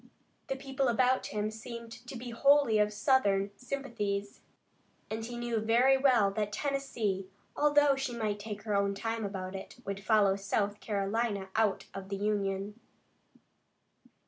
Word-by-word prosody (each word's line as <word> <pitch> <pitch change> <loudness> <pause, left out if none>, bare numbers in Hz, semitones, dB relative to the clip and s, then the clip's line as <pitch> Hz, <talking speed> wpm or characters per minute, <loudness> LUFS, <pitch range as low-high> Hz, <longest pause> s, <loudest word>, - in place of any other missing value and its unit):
The 270 - -1
people 270 0 -1
about 255 +2 +2
him 210 0 -2
seemed 230 +1 -8 0.2
to 255 - -7
be 240 0 -7
wholly 275 -2 +4
of 210 0 +3
Southern 205 -3 +2
sympathies, 215 -7 -3 0.7
and 220 +1 -3
he 240 +1 -6
knew 240 -1 -1
very 235 +5 +4
well 250 -7 +4
that 210 0 -2
Tennessee, 220 -7 -2 0.3
although 290 -1 +4
she 270 -3 -3
might 215 -3 -1
take 210 0 -6
her 215 -2 -2
own 200 0 +1
time 225 +2 -3
about 190 -2 -4
it, 190 - -8
would 195 0 -4
follow 210 -3 +4
South 200 +1 -1
Carolina 200 -1 -1
out 220 -3 +2
of 195 0 -7
the 200 - -2
Union. 200 0 -1
215 Hz, 145 wpm, -31 LUFS, 200-245 Hz, 0.7 s, wholly